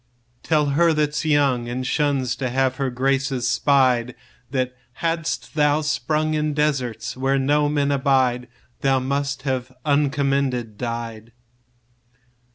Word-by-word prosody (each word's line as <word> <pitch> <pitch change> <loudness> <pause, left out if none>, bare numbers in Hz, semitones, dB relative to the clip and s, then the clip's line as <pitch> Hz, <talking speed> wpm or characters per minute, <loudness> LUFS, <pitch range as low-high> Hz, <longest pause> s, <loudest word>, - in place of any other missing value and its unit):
5 - - -18
Tell 155 -2 +3
her 165 +3 +3
that 150 -1 0
's 150 - -2
young, 140 -6 +2
And 130 +1 -3
shuns 135 -3 0
to 130 -2 -2
have 130 +1 0
her 135 -2 -1
graces 135 0 0
spied, 125 -3 +2 0.3
That 130 -1 -2 0.2
hadst 165 +2 -2
thou 150 0 +2
sprung 155 +1 0
In 150 -1 -1
deserts 140 -6 -1
where 135 +1 +1
no 145 +2 +2
men 145 -1 +1
abide, 130 -3 +1 0.3
Thou 135 -1 +2
must 140 +2 -2
have 130 -2 -2
uncommended 140 -5 0
died. 115 -1 -5
135 Hz, 135 wpm, -22 LUFS, 125-150 Hz, 0.3 s, Tell